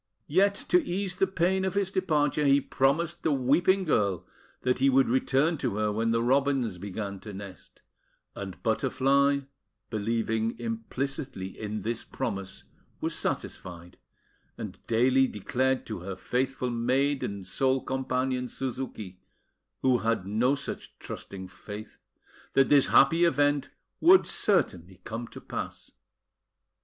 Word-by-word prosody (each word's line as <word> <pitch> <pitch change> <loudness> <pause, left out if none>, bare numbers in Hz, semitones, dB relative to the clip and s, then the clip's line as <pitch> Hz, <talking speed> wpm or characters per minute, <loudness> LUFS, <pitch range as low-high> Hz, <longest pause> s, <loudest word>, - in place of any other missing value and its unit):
Yet 195 +6 +3
to 360 -2 +5
ease 185 -4 -2
the 195 - +3
pain 190 +1 +1
of 190 0 -1
his 200 -1 0
departure, 150 -6 +1
he 140 0 +5
promised 140 +5 0
the 160 - +1
weeping 150 +9 +3
girl 100 - +1 0.4
that 125 0 +1
he 135 +1 +4
would 135 0 +4
return 135 +5 +2
to - - -1
her 105 0 +1
when 115 +2 0
the 115 0 +2
robins 130 -6 +1
began 100 0 -5
to 105 - -9
nest; 95 -1 -11 0.5
and 95 -2 -8
Butterfly, 135 +4 +2 0.5
believing 115 +1 -1
implicitly 115 -2 -4
in 105 +2 -5
this 115 +1 -3
promise, 100 -7 -5 0.4
was - - -2
satisfied, 90 -1 -5 0.6
and - - -7
daily 130 +3 +4
declared 130 +5 -1
to 110 - -5
her 95 +2 -6
faithful 125 +2 -1
maid 130 +4 +1
and 100 -2 -4
sole 130 +7 +1
companion, 130 -1 -1
Suzuki, 120 -8 -5 0.6
who 130 -2 +4
had 115 -4 0
no 115 +7 +2
such 140 - -7
trusting 95 -1 -8
faith, 105 +3 -10 0.5
that 135 - +4
this 140 -2 +6
happy 165 +5 +5
event 145 -4 +2 0.3
would 360 +3 +7
certainly 95 - 0
come 115 +2 -5
to - - -10
pass. - - -6
130 Hz, 135 wpm, -28 LUFS, 110-140 Hz, 0.6 s, would